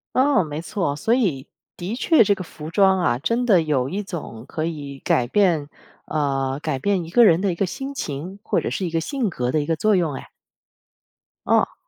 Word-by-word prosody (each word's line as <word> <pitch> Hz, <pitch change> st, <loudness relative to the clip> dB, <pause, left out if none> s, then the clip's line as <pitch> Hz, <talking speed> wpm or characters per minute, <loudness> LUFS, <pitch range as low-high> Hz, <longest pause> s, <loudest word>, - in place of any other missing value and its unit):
哦， 265 Hz, -5 st, +4 dB
没 150 Hz, 0 st, -5 dB
错。 170 Hz, -5 st, -2 dB
所 225 Hz, +10 st, +1 dB
以 165 Hz, -, 0 dB, 0.3 s
的 185 Hz, +6 st, -4 dB
确 295 Hz, +1 st, +4 dB
这 205 Hz, -1 st, +2 dB
个 185 Hz, -, -6 dB
服 155 Hz, -2 st, -9 dB
装 190 Hz, +2 st, +4 dB
啊， 175 Hz, -9 st, +1 dB
真 235 Hz, -, -1 dB
的 185 Hz, -7 st, +5 dB
有 135 Hz, -4 st, 0 dB
一 200 Hz, +6 st, -3 dB
种 150 Hz, -, -7 dB
可 155 Hz, -, -4 dB
以 145 Hz, -4 st, -5 dB
改 125 Hz, -, +2 dB
变 160 Hz, -1 st, +2 dB, 0.4 s
呃， 135 Hz, -2 st, -1 dB
改 155 Hz, -4 st, -2 dB
变 190 Hz, +5 st, 0 dB
一 165 Hz, -, -9 dB
个 235 Hz, +7 st, +6 dB
人 170 Hz, -3 st, +5 dB
的 195 Hz, -2 st, +1 dB
一 -, -, -3 dB
个 195 Hz, -, 0 dB
心 270 Hz, +9 st, -6 dB
情， 165 Hz, -, -5 dB
或 -, -, 0 dB
者 -, -, -2 dB
是 190 Hz, -, -2 dB
一 170 Hz, -, -3 dB
个 165 Hz, 0 st, 0 dB
性 260 Hz, -, -2 dB
格 125 Hz, -4 st, -2 dB
的 155 Hz, -, +1 dB
一 145 Hz, -, -2 dB
个 165 Hz, +1 st, 0 dB
作 215 Hz, +5 st, +2 dB
用 170 Hz, -5 st, +1 dB
哎。 135 Hz, -, -8 dB, 1.2 s
哦。 -, -, +2 dB
170 Hz, 230 characters per minute, -22 LUFS, 145-200 Hz, 1.2 s, 个